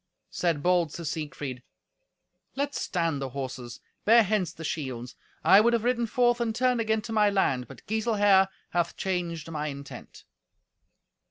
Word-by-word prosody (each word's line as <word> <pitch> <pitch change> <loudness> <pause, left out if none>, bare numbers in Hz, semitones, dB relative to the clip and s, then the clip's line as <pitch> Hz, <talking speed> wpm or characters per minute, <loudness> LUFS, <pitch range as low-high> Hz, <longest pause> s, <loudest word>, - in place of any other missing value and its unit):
Said 165 -5 -1
bold 175 -3 +2
Sir 170 - -7
Siegfried, 145 -5 -5 0.9
"Let 285 +1 -1
stand 165 - -1
the 135 - -3
horses, 130 -2 -6 0.2
bear 230 +2 +6
hence 200 -4 0
the 165 - -10
shields. 130 -6 -4 0.3
I 195 - +7
would 235 +2 +3
have 230 -2 +1
ridden 240 -1 +1
forth 240 0 +2
and 225 -2 -1
turned 250 -1 +2
again 220 -1 0
to 225 - -5
my 210 -1 +4
land, 135 - +1
but - - -13
Giselher 205 -3 +3 0.2
hath 170 -1 -1
changed 170 -4 -3
my 150 -1 -3
intent." 140 -1 -9
180 Hz, 155 wpm, -27 LUFS, 150-220 Hz, 0.9 s, I